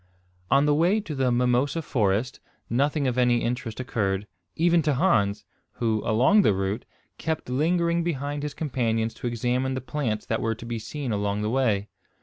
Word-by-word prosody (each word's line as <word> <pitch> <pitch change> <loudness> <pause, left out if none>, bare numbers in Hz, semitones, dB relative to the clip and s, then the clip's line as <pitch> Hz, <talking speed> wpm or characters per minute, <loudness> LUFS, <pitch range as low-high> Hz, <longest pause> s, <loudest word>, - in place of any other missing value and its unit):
On 140 +1 +4
the 150 - +3
way 175 +8 +3
to 170 -7 -6
the 130 -3 +1
mimosa 125 +6 +1
forest 110 -1 0 0.3
nothing 140 +4 +1
of 125 -1 0
any 120 -1 +3
interest 120 -1 -3
occurred, 105 -6 -1 0.3
even 170 +1 +3
to 150 -2 +1
Hans, 110 - +2 0.3
who, 110 -3 0
along 130 - +4
the 105 - +3
route, 95 +4 -2 0.3
kept 160 -5 -3
lingering 170 +4 +1
behind 145 -3 -2
his 150 0 -4
companions 115 -6 -1
to 120 - -5
examine 125 +3 -1
the - - -2
plants 125 -5 -3
that 110 - -1
were 115 0 0
to 115 - -10
be 115 -1 -3
seen 130 +4 -5
along 100 0 -1
the 105 - -1
way. 110 -6 +1
125 Hz, 175 wpm, -25 LUFS, 110-150 Hz, 0.3 s, On